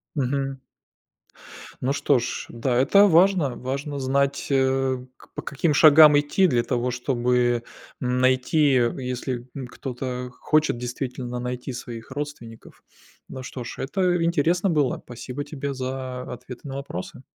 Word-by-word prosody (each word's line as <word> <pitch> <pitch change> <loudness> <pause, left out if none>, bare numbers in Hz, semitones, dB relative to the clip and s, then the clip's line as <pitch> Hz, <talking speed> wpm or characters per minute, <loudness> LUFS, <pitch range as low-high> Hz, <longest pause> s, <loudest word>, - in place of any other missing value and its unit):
Мгм. 135 0 -1 1.2
Ну 135 +2 +1
что 140 -2 +2
ж, 120 +1 -4
да, 120 +1 -1
это 200 +11 +6
важно. 175 -6 +4
Важно 140 +3 -4
знать, 140 +1 0
э, 135 -1 +2 0.2
к - - -20
по - - -4
каким 150 +3 -1
шагам 150 0 +8
идти 150 +6 +2
для 120 -7 +2
того, 125 0 -1
чтобы 120 -1 +1 0.4
найти, 130 +4 +2 0.3
если 125 -1 -4
н 130 - -5
кто-то 125 0 -5
хочет 155 +2 +1
действительно 125 0 -4
найти 125 +1 -4
своих 120 -1 -8
родственников. 130 -5 -8 0.5
Ну 130 - -7
что 130 -1 -7
ж, - - -7
это 175 +4 0
интересно 170 +3 +2
было. 150 -6 +1
Спасибо 125 +3 -6
тебе 140 -1 -5
за 130 -1 -4
ответы 125 +2 -9
на 135 - -5
вопросы. 135 -10 -7
130 Hz, 135 wpm, -24 LUFS, 125-145 Hz, 1.2 s, шагам